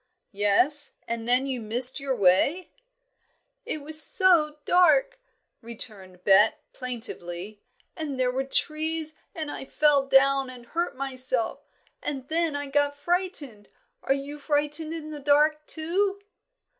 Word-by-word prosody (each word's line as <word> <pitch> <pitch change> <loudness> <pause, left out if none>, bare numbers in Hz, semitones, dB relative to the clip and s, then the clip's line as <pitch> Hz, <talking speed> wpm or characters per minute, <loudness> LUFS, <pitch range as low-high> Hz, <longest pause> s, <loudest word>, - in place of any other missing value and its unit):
"Yes; 210 +9 +2
and 230 0 -4
then 250 +2 +2
you 260 -3 -4
missed 245 +5 +4
your 275 -1 -2
way?" 220 - +2 0.9
"It 305 - -5
was 310 +1 +5
so 320 -5 +3
dark," - - +3 0.4
returned 200 -6 -7
Bet, 210 +9 +4
plaintively, 215 -6 -5 0.3
"and 295 -5 -5
there 250 -1 +1
were 265 +1 -2
trees, 310 +3 -1 0.2
and 310 -3 -4
I - - -6
fell 285 -1 +2
down 270 0 +3
and 250 -2 -11
hurt 335 +3 -3
myself, 260 -3 -3 0.3
and 270 -3 -4
then 325 -1 0
I 285 0 -3
got 285 +1 0
frightened. 295 - -2 0.3
Are 270 - +1
you 285 +2 -7
frightened 295 +2 -1
in 315 -2 -7
the 300 - -7
dark, 300 +2 +2
too?" 385 +5 -1
285 Hz, 130 wpm, -26 LUFS, 250-310 Hz, 0.9 s, was